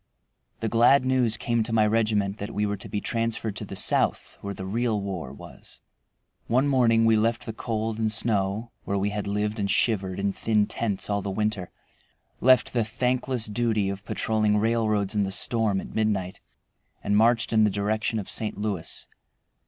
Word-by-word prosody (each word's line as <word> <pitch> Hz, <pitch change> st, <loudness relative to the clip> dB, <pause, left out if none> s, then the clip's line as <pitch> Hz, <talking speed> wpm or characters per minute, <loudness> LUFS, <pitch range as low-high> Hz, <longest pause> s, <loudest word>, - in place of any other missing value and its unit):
The 115 Hz, -, 0 dB
glad 120 Hz, +5 st, +4 dB
news 125 Hz, -4 st, +2 dB
came 115 Hz, +1 st, 0 dB
to 110 Hz, +1 st, -3 dB
my 110 Hz, -1 st, +4 dB
regiment 105 Hz, -2 st, +1 dB
that 100 Hz, -, -4 dB
we 105 Hz, -, +1 dB
were 105 Hz, 0 st, -1 dB
to 100 Hz, -, -11 dB
be 105 Hz, -, -2 dB
transferred 115 Hz, -2 st, -2 dB
to 105 Hz, -, -3 dB
the 100 Hz, -, -8 dB
South, -, -, +1 dB
where 100 Hz, 0 st, -5 dB
the 95 Hz, -, -6 dB
real 110 Hz, +2 st, 0 dB
war 95 Hz, -9 st, -5 dB
was. 70 Hz, -, -12 dB, 0.7 s
One 130 Hz, +4 st, +2 dB
morning 115 Hz, -4 st, +3 dB
we 115 Hz, 0 st, +5 dB
left 115 Hz, +2 st, 0 dB
the 110 Hz, -, -5 dB
cold 110 Hz, -1 st, -3 dB
and 110 Hz, -1 st, +1 dB
snow, 105 Hz, 0 st, 0 dB
where 100 Hz, -, -2 dB
we 100 Hz, +1 st, 0 dB
had 105 Hz, -1 st, -3 dB
lived 105 Hz, +2 st, -1 dB
and 100 Hz, -1 st, -1 dB
shivered 95 Hz, -3 st, +1 dB
in 100 Hz, 0 st, 0 dB
thin 105 Hz, -1 st, +1 dB
tents 105 Hz, -2 st, -2 dB
all 100 Hz, -1 st, -1 dB
the 100 Hz, -, -4 dB
winter, 105 Hz, -2 st, -2 dB, 0.7 s
left 130 Hz, +1 st, +4 dB
the 120 Hz, -2 st, +2 dB
thankless 125 Hz, +1 st, 0 dB
duty 110 Hz, -2 st, 0 dB
of 100 Hz, 0 st, -7 dB
patrolling 110 Hz, -1 st, 0 dB
railroads 110 Hz, -2 st, +1 dB
in 105 Hz, -, +1 dB
the 95 Hz, -1 st, -1 dB
storm 105 Hz, -1 st, +1 dB
at -, -, -8 dB
midnight, 100 Hz, -4 st, -1 dB, 0.6 s
and 100 Hz, -, +1 dB
marched 115 Hz, +2 st, +3 dB
in 110 Hz, -1 st, +5 dB
the 105 Hz, -, +4 dB
direction 105 Hz, +2 st, -1 dB
of 100 Hz, -, -4 dB
St. 110 Hz, -1 st, -2 dB
Louis. 100 Hz, -5 st, -4 dB
110 Hz, 185 wpm, -26 LUFS, 100-115 Hz, 0.7 s, we